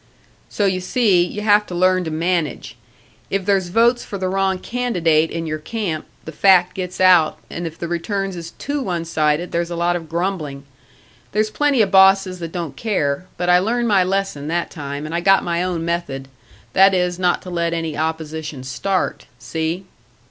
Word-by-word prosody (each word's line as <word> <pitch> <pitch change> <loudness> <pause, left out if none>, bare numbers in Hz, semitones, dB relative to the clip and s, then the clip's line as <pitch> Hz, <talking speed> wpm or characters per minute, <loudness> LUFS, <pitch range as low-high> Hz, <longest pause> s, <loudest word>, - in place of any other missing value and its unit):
"So 205 - 0
you 190 -1 +1
see, 190 -2 +3
you 205 +4 -5
have 210 0 +3
to 180 - -6
learn 185 0 +2
to - - -2
manage. 165 -2 -2 0.5
If 195 -1 -1
there's 195 -3 +2
votes 235 +6 +3
for 200 - -6
the 185 -1 -2
wrong 190 0 +1
candidate 175 -10 +1
in 165 0 -4
your 155 -1 -3
camp, 170 -3 -4 0.2
the 160 - -6
fact 185 +2 +4
gets 180 -1 -5
out, 180 -4 +5
and 170 0 -4
if 165 - -9
the 170 - -4
returns 195 +3 -2
is 165 -1 -7
too 285 0 -3
one 175 -8 -2
sided, 155 +1 0
there's 170 0 -1
a 170 - -4
lot 175 +1 +1
of 165 -2 -6
grumbling. 165 -5 -3 0.7
There's 215 +1 +1
plenty 285 -4 +3
of 195 - -2
bosses 190 -1 +5
that 165 -1 -6
don't 165 -6 -5
care, 180 -6 -1
but 175 - -2
I 180 0 +6
learned 235 +4 0
my 195 -3 +4
lesson 185 -6 -2
that 170 +2 -2
time, 145 -2 -6
and 155 - -6
I 170 - +1
got 195 +2 +4
my 170 0 -1
own 180 -3 -2
method 155 -6 -3 0.4
that 195 0 +6
is 180 -1 0
not 180 -1 +1
to 180 - -8
let 170 -1 0
any 165 -2 -3
opposition 155 -2 -4
start. 185 +9 -2
See?" 160 +8 -3
175 Hz, 190 wpm, -20 LUFS, 165-195 Hz, 0.7 s, I